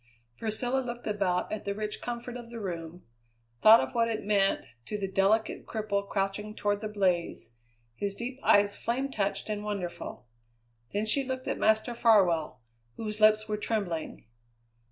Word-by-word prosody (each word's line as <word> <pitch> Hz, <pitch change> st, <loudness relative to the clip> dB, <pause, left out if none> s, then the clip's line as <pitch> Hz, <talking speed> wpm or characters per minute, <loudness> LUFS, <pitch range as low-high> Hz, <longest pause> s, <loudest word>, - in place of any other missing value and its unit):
Priscilla 245 Hz, +4 st, 0 dB
looked 240 Hz, -2 st, -5 dB
about 195 Hz, -4 st, 0 dB
at 215 Hz, -, -3 dB
the 200 Hz, 0 st, -2 dB
rich 210 Hz, 0 st, -4 dB
comfort 240 Hz, 0 st, -5 dB
of 240 Hz, -1 st, -8 dB
the 235 Hz, -1 st, -7 dB
room, 175 Hz, -3 st, -6 dB, 0.6 s
thought 220 Hz, -, +9 dB
of -, -, -2 dB
what 230 Hz, -1 st, +2 dB
it 225 Hz, -1 st, -2 dB
meant 200 Hz, -2 st, +2 dB, 0.2 s
to 210 Hz, -, -4 dB
the 195 Hz, -1 st, -2 dB
delicate 195 Hz, +3 st, +1 dB
cripple 200 Hz, -2 st, -2 dB
crouching 205 Hz, +2 st, -2 dB
toward 205 Hz, 0 st, 0 dB
the 215 Hz, -, -2 dB
blaze, 180 Hz, -, -1 dB, 0.4 s
his 200 Hz, +5 st, -2 dB
deep 250 Hz, +4 st, -5 dB
eyes 205 Hz, 0 st, +4 dB
flame 265 Hz, +4 st, -2 dB
touched 200 Hz, -5 st, -1 dB
and 210 Hz, -1 st, -3 dB
wonderful. 195 Hz, -10 st, -5 dB, 0.7 s
Then 205 Hz, +2 st, -1 dB
she 275 Hz, +6 st, +1 dB
looked 260 Hz, 0 st, -4 dB
at -, -, -2 dB
Master 220 Hz, +3 st, +2 dB
Farwell, 190 Hz, -, +3 dB, 0.4 s
whose 215 Hz, -1 st, -4 dB
lips 215 Hz, 0 st, +5 dB
were 210 Hz, -1 st, -1 dB
trembling. 200 Hz, -, -3 dB
210 Hz, 160 wpm, -29 LUFS, 195-230 Hz, 0.7 s, thought